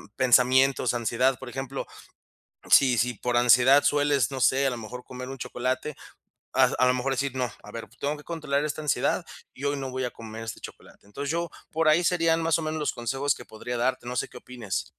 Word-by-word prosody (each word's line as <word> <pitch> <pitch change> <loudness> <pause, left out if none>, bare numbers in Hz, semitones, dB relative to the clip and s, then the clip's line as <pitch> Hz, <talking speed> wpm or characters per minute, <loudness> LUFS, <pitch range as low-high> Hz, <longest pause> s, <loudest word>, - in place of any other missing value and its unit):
pensamientos, 130 0 +4
ansiedad, 120 +3 +1
por 130 - -10
ejemplo. 135 +2 -5 0.9
Sí 130 -3 +6
si 125 +1 +1
por 120 +3 -2
ansiedad 125 +4 +6
sueles, 145 -4 +2
no 135 - -4
sé, 135 +2 +3
a - - +2
lo 125 - -4
mejor 120 +3 -8
comer 125 0 -8
un 135 0 -7
chocolate, 130 +5 -3 0.6
a - - +5 0.2
a 130 - +5
lo 125 - +4
mejor 130 +2 -1
decir: 135 0 -2
"No, 125 -3 -1
a 105 - -11
ver, 115 0 -7
tengo 145 +2 -2
que 150 - -13
controlar 150 -3 -2
esta 150 +1 -3
ansiedad 150 -4 0 0.3
y 135 - -7
hoy 140 0 0
no 135 -1 -5
voy 130 0 -2
a - - -2
comer 110 0 -9
este 115 - -6
chocolate". - - -12
Entonces 140 +8 -5
yo 170 +1 -1 0.2
por 160 0 +1
ahí 160 +3 +4
serían 165 -2 +2
más 165 -1 +2
o - - -4
menos 155 0 -3
los 150 - 0
consejos 135 +4 -1
que - - -11
podría 120 +3 -6
darte. 120 0 -1
No 125 - -4
sé - - 0
qué - - -12
opines. 120 -6 -5
130 Hz, 220 wpm, -26 LUFS, 125-145 Hz, 0.9 s, Sí